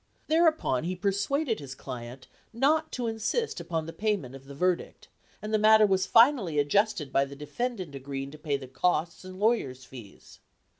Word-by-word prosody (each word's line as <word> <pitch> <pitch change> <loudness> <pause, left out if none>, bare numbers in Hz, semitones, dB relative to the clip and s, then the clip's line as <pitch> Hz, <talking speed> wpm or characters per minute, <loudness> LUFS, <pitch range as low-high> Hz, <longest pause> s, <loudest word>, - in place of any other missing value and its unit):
Thereupon 315 - +2
he 185 +2 -2
persuaded 210 - 0
his 135 -2 -8
client 125 -1 -8 0.3
not 300 +7 +1
to 245 - -3
insist 225 - -2
upon 165 -2 -3
the 165 - -7
payment 205 - -2
of 135 0 -12
the 140 0 -10
verdict, 180 +3 -2 0.3
and 215 +1 -4
the 215 - +3
matter 215 0 +6
was 190 -2 +1
finally 230 - +4
adjusted 150 0 +1
by 135 - +4
the 140 0 -7
defendant 185 - -4
agreeing 135 0 -6
to 155 - -12
pay 145 -2 -1
the 135 -1 -10
costs 170 +6 -1
and 185 0 -10
lawyers' 140 - 0
fees. 115 -7 -13
180 Hz, 170 wpm, -28 LUFS, 140-220 Hz, 0.3 s, matter